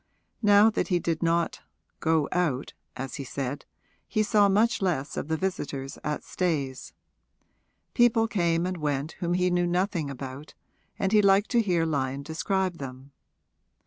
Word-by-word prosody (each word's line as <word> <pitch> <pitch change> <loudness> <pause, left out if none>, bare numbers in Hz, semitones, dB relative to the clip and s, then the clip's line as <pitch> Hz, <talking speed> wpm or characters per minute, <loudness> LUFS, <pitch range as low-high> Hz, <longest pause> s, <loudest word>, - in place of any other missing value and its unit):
Now 210 0 +6
that - - -1
he 180 - +2
did 165 -2 -2
not 170 0 0 0.4
'go 160 -3 +2
out,' 150 -7 -1 0.2
as 135 0 -5
he 140 - -4
said, 135 +2 -4 0.4
he 215 - +1
saw 205 -1 +4
much 215 +4 +2
less 155 -7 -1
of - - -3
the 160 0 0
visitors 145 -7 -4
at 150 0 -3
Stayes: 145 -8 -2 1.0
people 230 -2 +4
came 170 -5 +1
and 185 0 -2
went 145 -1 -2
whom 175 0 0
he 180 0 +2
knew 175 0 +2
nothing 175 -3 0
about, 135 +2 -8 0.4
and 195 - 0
he 215 -1 +6
liked 200 +1 +4
to 240 -2 +4
hear 175 -6 +1
Lyon 140 -3 -1
describe 180 +3 -1
them. 135 0 -8
170 Hz, 155 wpm, -27 LUFS, 140-190 Hz, 1.0 s, Now